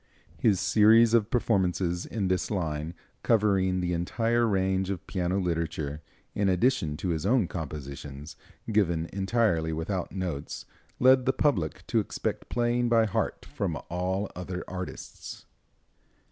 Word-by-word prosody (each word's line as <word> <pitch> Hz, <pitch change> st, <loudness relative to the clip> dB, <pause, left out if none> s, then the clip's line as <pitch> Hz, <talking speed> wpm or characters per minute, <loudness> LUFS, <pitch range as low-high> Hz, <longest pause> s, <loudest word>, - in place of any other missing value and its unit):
His 100 Hz, -5 st, +3 dB
series 110 Hz, +3 st, +5 dB
of 115 Hz, -2 st, +3 dB
performances 90 Hz, -6 st, 0 dB
in 100 Hz, -4 st, -2 dB
this 95 Hz, 0 st, 0 dB
line, 80 Hz, -4 st, -2 dB, 0.3 s
covering 95 Hz, -5 st, +2 dB
the 90 Hz, 0 st, -1 dB
entire 115 Hz, +7 st, +1 dB
range 95 Hz, -2 st, +1 dB
of 95 Hz, -3 st, -4 dB
piano 90 Hz, 0 st, -1 dB
literature, 80 Hz, -4 st, -2 dB, 0.3 s
in 100 Hz, -1 st, +1 dB
addition 90 Hz, -, +1 dB
to 90 Hz, -, -3 dB
his 80 Hz, -3 st, -1 dB
own 110 Hz, -1 st, +3 dB
compositions, 70 Hz, -2 st, -7 dB, 0.4 s
given 85 Hz, -6 st, +1 dB
entirely 95 Hz, -5 st, +1 dB
without 85 Hz, +4 st, -3 dB
notes, 85 Hz, -6 st, -4 dB, 0.3 s
led 130 Hz, 0 st, +5 dB
the 130 Hz, -, +4 dB
public 95 Hz, -, 0 dB
to -, -, +1 dB
expect -, -, -3 dB
playing 120 Hz, 0 st, +1 dB
by 115 Hz, -1 st, +4 dB
heart 105 Hz, -, -2 dB
from -, -, -3 dB
all 95 Hz, +3 st, -1 dB
other 90 Hz, 0 st, -5 dB
artists. 90 Hz, 0 st, -7 dB
95 Hz, 130 wpm, -28 LUFS, 85-110 Hz, 0.4 s, series